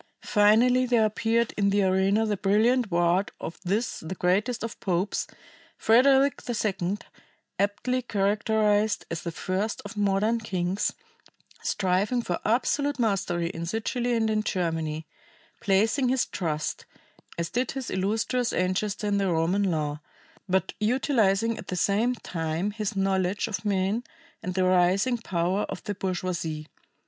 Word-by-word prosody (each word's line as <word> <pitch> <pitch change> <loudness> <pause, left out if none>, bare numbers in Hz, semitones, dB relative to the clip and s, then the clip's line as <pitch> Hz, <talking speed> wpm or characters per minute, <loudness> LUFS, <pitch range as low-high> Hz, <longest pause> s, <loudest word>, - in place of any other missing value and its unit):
Finally 240 +4 +4
there 235 -3 +4
appeared 225 +2 0
in 200 -1 +3
the 200 0 +2
arena 190 +3 +2
the 210 -1 0
brilliant 215 +5 +2
ward 175 +2 +2
of 165 - -7
this 205 +6 -1
the 160 +4 -6
greatest 205 +7 0
of 230 +1 -5
popes, 185 +1 -1 0.5
Frederick 265 +4 +4
II, 200 -4 -1 0.6
aptly 205 +6 0
characterized 210 0 +1
as 165 - -3
the 170 - -4
first 190 +6 -2
of - - -8
modern 205 +3 +1
kings, 190 -2 -1 0.7
striving 200 +6 0
for 175 - -2
absolute 285 +6 +1
mastery 185 -7 0
in 165 -2 -6
Sicily 240 +4 -1
and 225 -1 +1
in 215 0 +1
Germany, 160 -5 -2 0.5
placing 220 +7 +2
his 260 -1 +2
trust, 155 -4 -3 0.5
as 170 0 -3
did 250 +1 -1
his 265 -3 -5
illustrious 220 +6 0
ancestor 195 +3 -1
in 205 -1 +1
the 195 -2 +1
Roman 165 +4 +1
law, 150 -2 -2 0.5
but 190 +1 +1
utilizing 225 -2 +2
at - - -9
the 180 - -3
same 205 +8 +1
time 165 -1 -3
his 210 -1 -3
knowledge 195 +1 0
of 215 -2 -4
men 200 +2 0 0.4
and 180 0 -4
the 185 - +2
rising 185 +7 +3
power 185 -1 0
of - - -6
the 205 - -3
bourgeoisie. 180 -5 -3
205 Hz, 140 wpm, -26 LUFS, 185-225 Hz, 0.7 s, Finally